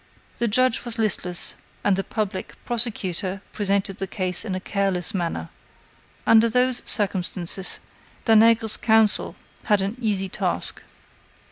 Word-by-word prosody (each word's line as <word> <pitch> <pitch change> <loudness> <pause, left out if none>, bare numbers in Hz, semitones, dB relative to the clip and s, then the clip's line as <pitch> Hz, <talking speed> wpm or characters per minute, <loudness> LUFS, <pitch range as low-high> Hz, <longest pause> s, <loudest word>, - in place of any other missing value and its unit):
The 235 - +1
judge 255 +2 +2
was 240 -1 -1
listless, 185 -5 0 0.3
and 200 - +3
the 195 - -1
public 205 -3 -4
prosecutor 200 -5 -2
presented 200 -1 0
the 195 - -2
case 185 -1 -2
in 200 -4 -3
a - - -2
careless 195 0 -1
manner. 165 - -2 0.8
Under 225 +1 +6
those 250 +1 +2
circumstances, 190 -2 -2 0.5
Danègre's 225 0 +5
counsel 220 -2 +4 0.3
had 210 -3 +3
an 200 +3 -2
easy 205 -5 0
task. - - 0
205 Hz, 125 wpm, -24 LUFS, 190-225 Hz, 0.8 s, Under